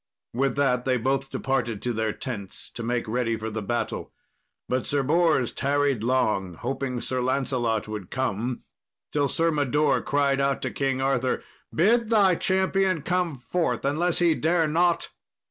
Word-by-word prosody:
With 135 +1 0
that 130 -3 +2
they 130 -1 +1
both 135 +3 0
departed 125 -5 -1
to 120 - -1
their 110 -1 0
tents 105 -6 -6
to - - -7
make 120 +1 -1
ready 115 0 0
for 110 0 -5
the 110 +1 -3
battle. 120 +4 -3 0.6
But 130 0 -1
Sir 140 -1 +1
Bors 155 -3 +2
tarried 140 -4 0
long, 105 -8 +1
hoping 130 +3 -3
Sir 130 -1 -2
Lancelot 125 -4 0
would 105 -4 -6
come, 125 -1 -2 0.5
till 145 -1 +1
Sir 165 +5 +2
Mador 150 0 +2
cried 140 -1 +1
out 140 0 0
to - - -2
King 135 -1 -1
Arthur, 135 -1 0 0.3
"Bid 220 +6 +3
thy 205 -5 +5
champion 190 -2 +1
come 180 -3 0
forth, 135 +8 -1
unless 165 +5 +1
he 170 -2 +4
dare 165 +1 +2
not." 170 +3 +2
135 Hz, 160 wpm, -25 LUFS, 120-155 Hz, 0.6 s, thy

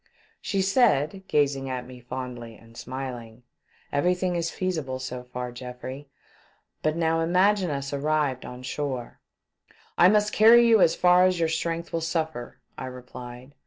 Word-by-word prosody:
She 195 -2 0
said, 190 - +2
gazing 140 -2 +1
at 125 -1 -4
me 125 0 -11
fondly 120 -2 -7
and 115 +1 -18
smiling: 125 -2 -7 0.5
"Everything 180 +4 +1
is 170 -1 -1
feasible 160 -10 -3
so 130 -1 -6
far, 125 0 -5
Geoffrey. 130 +3 -8 0.7
But 155 0 0
now 165 -1 +1
imagine 185 +3 +2
us 140 -1 -4
arrived 145 -2 0
on 125 +1 -9
shore." 130 -2 -4 0.4
" - - -31
I 180 - +8
must 210 0 +2
carry 235 +2 +7
you 225 -3 +5
as 165 - +4
far 180 0 +5
as 185 -1 +1
your 165 -1 +1
strength 165 +1 -3
will 165 - -1
suffer," 160 -6 -3 0.2
I 130 - -5
replied. 125 +1 -10
145 Hz, 155 wpm, -26 LUFS, 125-175 Hz, 0.7 s, I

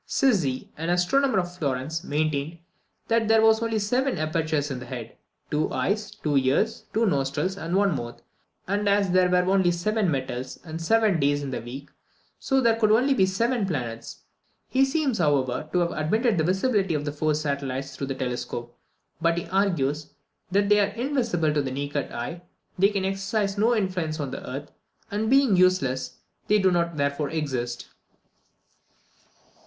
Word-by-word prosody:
Sizzi, 175 - +1
an 165 +2 -3
astronomer 195 +9 +2
of 175 -1 -1
Florence, 150 +1 -2
maintained 155 0 -1 0.5
that 230 0 +3
as 220 - -3
there 225 0 +5
were 220 0 +7
only 225 -1 0
seven 250 +6 0
apertures 155 -2 -1
in 130 - -4
the 125 - -8
head 120 -3 -7 0.4
two 150 +1 0
eyes, 210 +1 -1
two 160 -8 -3
ears, 140 +12 0
two 225 +1 +2
nostrils, 150 +2 0
and 175 -2 -3
one 195 -4 +3
mouth 120 -2 -6 0.5
and 205 +2 0
as 200 -2 +2
there 185 0 +4
were 180 0 +3
only 190 -2 +4
seven 190 +3 0
metals, 130 -3 -3
and 165 -1 -7
seven 215 0 +3
days 145 0 +1
in 135 - -4
the 125 - -3
week, 130 +5 -9 0.5
so 270 -1 +1
there 230 -3 +3
could 215 -2 +3
be 215 - +6
only 255 -4 +3
seven 230 +5 0
planets. 125 -11 -4 0.5
He 265 +1 +4
seems, 270 - 0
however, 145 -2 +1
to - - 0
have 170 0 0
admitted 205 +7 +1
the 155 - +2
visibility 190 -1 +1
of 145 0 -2
the 145 - -2
four 150 +1 0
satellites 140 -2 -3
through 140 - -4
the 135 - -3
telescope; 125 -2 -4 0.5
but 170 +1 +2
he 170 - -2
argues, 155 -7 0 0.3
that 200 +3 +3
as 200 - -3
they 210 0 +5
are 205 0 +1
invisible 235 - 0
to 150 - +2
the 135 - -3
naked 140 +1 -3
eye, 145 +9 -5 0.4
they 195 +2 +5
can 200 -2 -2
exercise 195 +1 -1
no 225 +4 +3
influence 180 -6 -1
on 140 -3 -3
the - - -7
earth; 140 +3 -6 0.4
and 215 +2 -1
being 270 -5 +5
useless, 180 -8 +2 0.3
they 210 - +4
do 190 -2 +3
not 170 -2 0
therefore 140 +1 0
exist. 130 -6 -3
175 Hz, 180 wpm, -25 LUFS, 140-205 Hz, 0.5 s, were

